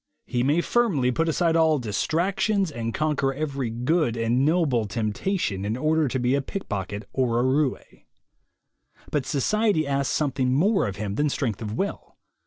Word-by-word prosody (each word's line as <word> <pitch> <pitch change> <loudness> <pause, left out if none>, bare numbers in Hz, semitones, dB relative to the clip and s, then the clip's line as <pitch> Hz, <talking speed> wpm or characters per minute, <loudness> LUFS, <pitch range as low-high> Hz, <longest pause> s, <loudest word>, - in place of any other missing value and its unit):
He 120 - -1
may 145 +7 +2
firmly 170 - +1
put 165 +6 0
aside 165 +1 +1
all 160 -2 +4
distractions 170 - 0
and 115 -4 -3
conquer 140 -1 0
every 140 -4 -2
good 125 +2 0
and 115 +3 +1
noble 145 -7 +2
temptation, 105 - -2
in 105 +3 -2
order 155 +2 +2
to 130 - -2
be 125 +1 +1
a 140 - +2
pickpocket 105 - -5
or 125 -3 +1
a - - +2
roue. 130 +1 +2 1.4
But 140 -4 -1
society 200 - +1
asks 140 -1 0
something 130 -3 0
more 195 - +2
of 100 - -4
him 100 -1 -4
than 150 - +2
strength 115 -7 -2
of 105 -1 -4
will. 195 - -4
135 Hz, 165 wpm, -25 LUFS, 120-160 Hz, 1.4 s, all